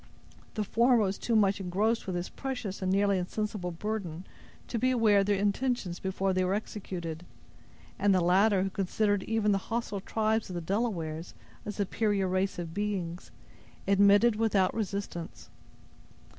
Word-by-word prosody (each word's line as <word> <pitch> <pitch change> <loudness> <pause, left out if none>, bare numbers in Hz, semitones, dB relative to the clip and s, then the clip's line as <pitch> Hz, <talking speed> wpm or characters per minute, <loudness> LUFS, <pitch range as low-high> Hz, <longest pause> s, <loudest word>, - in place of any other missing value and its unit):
The 215 - 0
former 240 +4 +3
was 200 -3 0
too 235 - 0
much 200 -2 +3
engrossed 200 +5 0
with 185 - -2
his 175 0 -2
precious 250 -8 -5
and 185 0 0
nearly 200 0 +3
insensible 205 0 -3
burden, 180 -2 -4 0.4
to 235 - -2
be 255 - +2
aware 225 -5 +4
of 195 - +1
their 205 - +3
intentions 205 -2 -1
before 190 0 -1
they 185 0 +1
were 185 +2 +1
executed; 175 -6 -5 0.8
and 205 +1 +3
the 185 - +4
latter, 190 +3 +4
who 195 - -2
considered 205 +1 0
even 225 -2 +1
the 195 - +2
hostile 225 -4 -2
tribes 220 +1 0
of 180 - -5
the - - -1
Delawares 170 -4 -2 0.3
a - - -1
superior 205 -1 0
race 185 +1 0
of 170 -2 -5
beings, 185 -4 -3 0.6
submitted 200 +3 +5
without 205 -4 +2
resistance. 200 -5 -5
200 Hz, 155 wpm, -29 LUFS, 185-215 Hz, 0.8 s, submitted